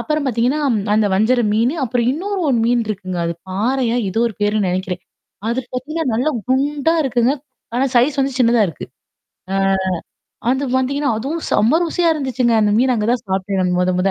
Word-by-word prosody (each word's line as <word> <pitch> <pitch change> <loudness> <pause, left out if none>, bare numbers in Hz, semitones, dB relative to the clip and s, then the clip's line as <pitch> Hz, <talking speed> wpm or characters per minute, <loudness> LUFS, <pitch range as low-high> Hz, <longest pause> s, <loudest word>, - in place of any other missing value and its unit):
அப்புறம் 305 -1 -1
பாத்தீங்கன்னா 250 +4 +1 0.4
அந்த 215 -1 +3
வஞ்சர 235 +5 +3
மீனு, 235 +6 +2
அப்புறம் 240 0 0
இன்னொரு 390 +5 -3
ஒன் 240 -3 +2
மீன் 240 -1 +2
இருக்குங்க, 185 -4 -4
அது 170 - -2
பாறையா? 235 +5 0
எதோ 225 +5 -1
ஒரு 215 - -10
பேருன்னு 205 -2 +1
நெனைக்கிறேன். 185 0 -3 0.5
அது 235 +2 0
பாத்தீங்கன்னா 310 +6 -3
நல்ல 250 +6 0 0.2
குண்டா 285 +4 +1
இருக்குங்க. 245 -1 +2 0.4
ஆனா 260 +2 +2
சைஸ் 270 +4 +3
வந்து 270 0 0
சின்னதா 235 -2 +4
இருக்கு. 165 - -7 0.7
ஆ - - 0 0.9
அது 265 +2 +1
வந்தீங்கன்னா, 280 +3 0
அதுவும் 280 +9 -3
செம 235 +10 +3
ருசியா 340 0 +1
இருந்துச்சுங்க. 260 -5 0
அந்த 210 -1 +3
மீன் 255 +2 +3
அங்க 215 -2 -1
தான் 245 0 +1
சாப்ட்டன் 190 +1 -1
நா - - +1
மொத 180 0 +2
மொத. 195 +2 +2
245 Hz, 175 wpm, -19 LUFS, 215-275 Hz, 0.9 s, சின்னதா